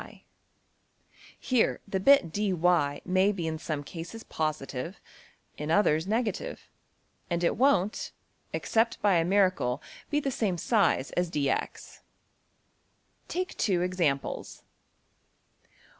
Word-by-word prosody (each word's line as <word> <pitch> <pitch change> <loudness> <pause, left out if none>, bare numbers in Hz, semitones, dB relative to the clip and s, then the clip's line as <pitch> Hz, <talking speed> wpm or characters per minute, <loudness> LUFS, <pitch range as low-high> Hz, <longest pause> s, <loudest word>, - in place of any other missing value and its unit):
Here 250 -3 +1
the 195 -1 -1
bit~$dy$ 205 - +4 0.5
may 185 +2 +3
be 180 -5 -4
in 160 -1 -3
some 155 -3 -3
cases 175 +9 -8
positive, 155 +1 -3 0.6
in 150 +1 -4
others 160 -2 +3
negative; 220 0 -2 0.6
and 175 0 -1
it 170 - +2
won't 215 -6 +2 0.4
(except 230 +1 0
by 200 -4 +4
a 165 - +3
miracle) 185 -9 +2 0.3
be 295 - +1
the 275 -2 -2
same 205 -7 -1
size 190 - +2
as~$dx$. 150 -6 -2 1.3
\Subsection{Take 365 +1 -3
two 185 -5 +1
examples. 170 -7 -2
185 Hz, 100 wpm, -28 LUFS, 160-210 Hz, 1.3 s, bit~$dy$